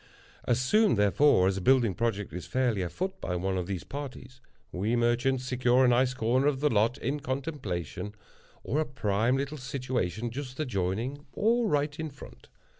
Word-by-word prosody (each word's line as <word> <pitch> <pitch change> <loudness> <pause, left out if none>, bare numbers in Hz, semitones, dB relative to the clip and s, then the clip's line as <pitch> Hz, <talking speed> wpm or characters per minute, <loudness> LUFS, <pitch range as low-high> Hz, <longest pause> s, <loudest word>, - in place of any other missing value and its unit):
As 120 0 +2
soon, 210 - +3
therefore, 105 0 +4
as 95 0 0
a - - -3
building 120 -2 +4
project 105 -5 -2
is 90 - -6
fairly 125 -6 +1
afoot 185 - -4
by 90 - -2
one 95 +2 -1
of 90 -2 -2
these 95 -3 -4
parties, 130 -2 -8 0.3
we 105 +6 0
merchants 120 +2 +1
secure 125 0 +3
a - - +5
nice 125 +1 +3
corner 130 +3 +2
of 140 -3 +1
the 150 +1 +2
lot 115 +3 +2
in 145 +2 -2
contemplation, 130 - -4 0.5
or 150 - -1
a 155 - +1
prime 115 -1 +1
little 140 +2 -3
situation 125 -5 -2
just 130 +1 -7
adjoining, 125 +3 -2
or 230 0 +2
tight 145 +1 0
in 160 -1 -3
front. 140 - -14
125 Hz, 175 wpm, -29 LUFS, 105-140 Hz, 0.5 s, a